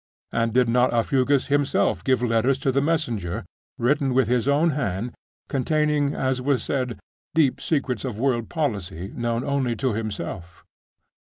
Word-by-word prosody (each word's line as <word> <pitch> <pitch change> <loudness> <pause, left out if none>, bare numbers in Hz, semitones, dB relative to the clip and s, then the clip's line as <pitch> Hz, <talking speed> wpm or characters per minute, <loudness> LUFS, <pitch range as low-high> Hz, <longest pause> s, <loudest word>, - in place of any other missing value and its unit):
And 115 0 0
did 125 +1 +3
not 125 +1 +3
Aufugus 130 +3 +2
himself 145 -1 +1
give 130 -2 +2
letters 120 +3 +2
to 135 - +4
the 140 +2 +2
messenger, 120 - -1 0.3
written 135 +1 +1
with 130 - +3
his 125 +1 +1
own 150 +4 +3
hand, 120 -5 -2 0.3
containing, 150 +1 +1
as 130 -1 0
was 130 -3 +1
said, 125 -5 -2 0.4
deep 140 -6 +3
secrets 135 -8 -1
of 125 -6 -4
worldly 120 -2 0
policy, 100 - -3
known 120 0 -1
only 135 -4 0
to 130 0 0
himself? 95 -5 -5
125 Hz, 150 wpm, -24 LUFS, 115-140 Hz, 0.4 s, to